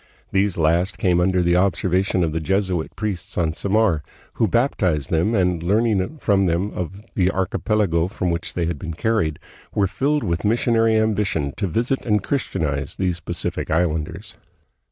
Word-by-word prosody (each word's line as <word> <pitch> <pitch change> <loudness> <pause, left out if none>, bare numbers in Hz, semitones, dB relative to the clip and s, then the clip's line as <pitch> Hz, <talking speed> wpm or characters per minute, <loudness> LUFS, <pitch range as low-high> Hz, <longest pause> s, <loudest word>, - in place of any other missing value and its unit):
These 100 -1 +1
last 85 +4 +2
came 90 -3 +2
under 90 0 +2
the 85 0 +3
observation 95 0 +1
of 80 - 0
the 80 - -1
Jesuit 95 -1 -1
priests 100 -5 -4
on 80 -3 +1
Samar, 100 -3 +1 0.3
who 110 - +1
baptized 90 - +1
them, 85 +8 +2
and, 90 -4 +1
learning 105 - +1
from 100 -8 +2
them 90 +5 0
of 95 +4 -6
the 95 -2 +2
archipelago 95 -2 0
from 90 -3 -2
which 85 0 -4
they 85 - 0
had 85 -3 -3
been 80 +2 -5
carried, 95 -6 0 0.4
were 100 - +3
filled 140 +10 0
with 85 -4 -1
missionary 115 +1 +2
ambition 105 -10 0
to 100 - -1
visit 120 +9 -1
and 105 -4 +1
Christianize 75 - -2
these 90 -2 -1
Pacific' 85 0 -4
islanders. 80 -2 -1
95 Hz, 160 wpm, -22 LUFS, 85-105 Hz, 0.4 s, the